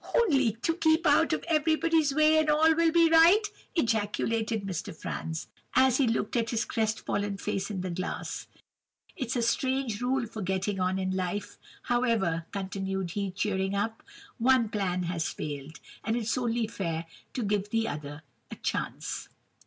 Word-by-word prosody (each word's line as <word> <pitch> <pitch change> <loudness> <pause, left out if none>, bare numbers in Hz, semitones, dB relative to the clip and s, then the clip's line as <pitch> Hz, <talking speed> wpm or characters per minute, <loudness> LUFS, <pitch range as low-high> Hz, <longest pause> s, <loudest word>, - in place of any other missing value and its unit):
"'Only 275 - +3
to 330 - +2
keep 320 0 +3
out - - +4
of - - -1
everybody's 320 -1 +2
way, 310 +2 +5
and 310 -1 +1
all 315 +2 +5
will 335 0 +3
be 335 0 +5
right,' 335 +7 +6 0.2
ejaculated 225 - 0
Mr. 180 -4 -4
Franz, 160 +1 -4 0.3
as 260 -1 +5
he 275 - +3
looked 225 -2 -1
at 230 -1 +1
his 230 -1 0
crest 220 -2 -1
fallen 205 -1 -1
face 195 +1 -2
in 195 -3 -3
the 185 -1 -3
glass. 185 +2 -4 0.7
'It's 260 -6 -3
a 240 - +1
strange 260 -2 0
rule 255 0 +1
for 220 -1 -7
getting 190 +1 -1
on 185 +1 +1
in 185 0 -1
life! 190 +2 -3 0.2
However,' 225 -10 +1
continued 190 -2 -3
he, 200 +1 -2
cheering 190 +1 -1
up, 220 +3 -2 0.4
'one 245 -1 +4
plan 185 -4 -1
has 170 -2 -1
failed, 145 +1 -6 0.2
and 225 - 0
it's 230 -2 0
only 240 -2 0
fair 170 -6 -3 0.3
to 250 - -1
give 205 0 0
the 225 +1 0
other 145 +1 -6 0.3
a - - -7
chance! - - -3
220 Hz, 165 wpm, -29 LUFS, 190-265 Hz, 0.7 s, right